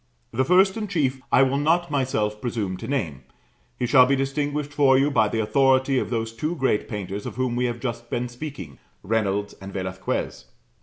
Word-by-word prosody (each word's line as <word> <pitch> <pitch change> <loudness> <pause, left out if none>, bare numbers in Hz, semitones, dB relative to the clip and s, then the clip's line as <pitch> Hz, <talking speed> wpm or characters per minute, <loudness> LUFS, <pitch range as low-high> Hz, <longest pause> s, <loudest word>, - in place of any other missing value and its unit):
The 130 - +1
first 190 +7 +4
and 210 -2 -4
chief 135 -7 0
I 130 - +6
will 135 +1 +1
not 165 +3 +1
myself 110 -7 -1
presume 110 -6 -2
to - - -7
name; 85 - -2 0.6
he 125 - -1
shall 125 0 +6
be 140 - +3
distinguished 145 +2 -2
for 140 -2 +5
you 140 +2 +2
by 110 -5 +3
the 110 - -2
authority 130 +3 +3
of - - -3
those 115 -2 -2
two 150 +9 -3
great 130 -8 0
painters 100 -1 -5
of - - -7
whom 130 -1 -1
we 125 +1 +1
have 120 -1 -2
just 120 -1 -5
been 125 +1 -2
speaking 120 - -8 0.2
Reynolds 105 -1 -1
and 95 0 -8
Velasquez. 95 -1 -4
130 Hz, 195 wpm, -24 LUFS, 105-140 Hz, 0.6 s, I